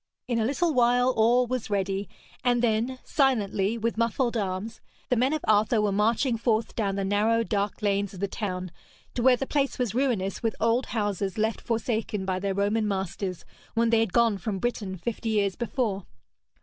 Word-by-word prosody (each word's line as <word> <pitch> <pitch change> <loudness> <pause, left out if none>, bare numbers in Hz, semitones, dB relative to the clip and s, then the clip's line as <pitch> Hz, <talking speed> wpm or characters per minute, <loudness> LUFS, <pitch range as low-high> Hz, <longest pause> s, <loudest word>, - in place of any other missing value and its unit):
In 240 -2 0
a 220 - +1
little 310 +6 +1
while 245 0 +4
all 240 +3 +4
was 250 -2 -3
ready, 195 0 -1 0.3
and 245 -1 +2
then, 235 +3 +1
silently, 225 -6 +1
with 230 0 -2
muffled 235 +1 +1
arms, 200 +1 -3 0.3
the 250 - +3
men 255 +4 +2
of 310 -1 -2
Arthur 215 +2 +3
were 210 -1 +2
marching 230 +5 +2
forth 225 -1 0
down 200 -4 0
the 195 - -1
narrow 215 +3 +2
dark 205 -1 -2
lanes 200 -1 +1
of - - -9
the 200 - 0
town 185 -3 -4 0.4
to 245 - -2
where 250 0 +5
the 270 - -2
place 280 0 0
was 245 -5 -1
ruinous 230 -7 0
with 225 -1 -1
old 230 +3 +2
houses 205 -3 -2
left 220 +1 0
forsaken 220 -3 -2
by 185 -1 -1
their 195 0 -2
Roman 210 +2 +1
masters 190 -2 -3 0.3
when 230 0 +2
they 230 - +4
had 225 -4 +1
gone 230 -2 +3
from 200 +1 -3
Britain 200 -3 -3
fifty 225 +5 -3
years 200 -3 +1
before. 225 -5 -2
220 Hz, 190 wpm, -27 LUFS, 200-240 Hz, 0.4 s, where